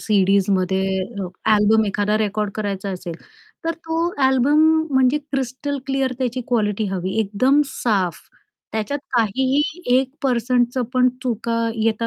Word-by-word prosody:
सीडीजमध्ये 190 -1 +2 0.6
album 215 +1 +4
एखादा 205 +1 0
record 210 -1 -1
करायचा 200 -2 -3
असेल, 180 -2 -6 0.5
तर 330 - +1
तो 330 +1 -2 0.2
अल्बम 265 +3 +3 0.3
म्हणजे 265 +2 +3
क्रिस्टल 275 0 -3
क्लिअर 270 -1 0
त्याची 255 -1 -1
क्वालिटी 215 -3 0
हवी, 190 +1 -3
एकदम 255 +8 +2
साफ. 195 - -1 0.5
त्याच्यात 220 +7 -2 0.2
काहीही 260 +6 +2 0.4
1% 255 -3 0 0.2
पण 255 0 +5
चुका 230 -1 -1
येता 225 +1 0
230 Hz, 115 wpm, -21 LUFS, 205-265 Hz, 0.6 s, पण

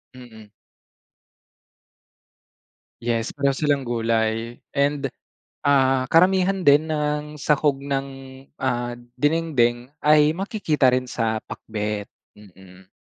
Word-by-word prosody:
Mm. 110 -4 -13 2.5
Yes, 115 -1 -1
pareho 140 -1 0
silang 140 -3 0
gulay 115 0 -1 0.2
and, 140 0 +1 0.6
ah, 135 -2 +3
karamihan 185 +2 +3
din 150 +3 +5
ng 150 0 -2
sahog 145 -1 +1
ng, 140 0 -3 0.5
ah, 120 -2 -2 0.2
dinengdeng 130 -5 +1 0.2
ay 150 0 +5
makikita 180 - +1
rin 130 0 0
sa 115 -3 -1
pakbet. 105 -1 -5 0.2
Mm. 95 -2 -17
135 Hz, 90 wpm, -23 LUFS, 115-150 Hz, 2.5 s, din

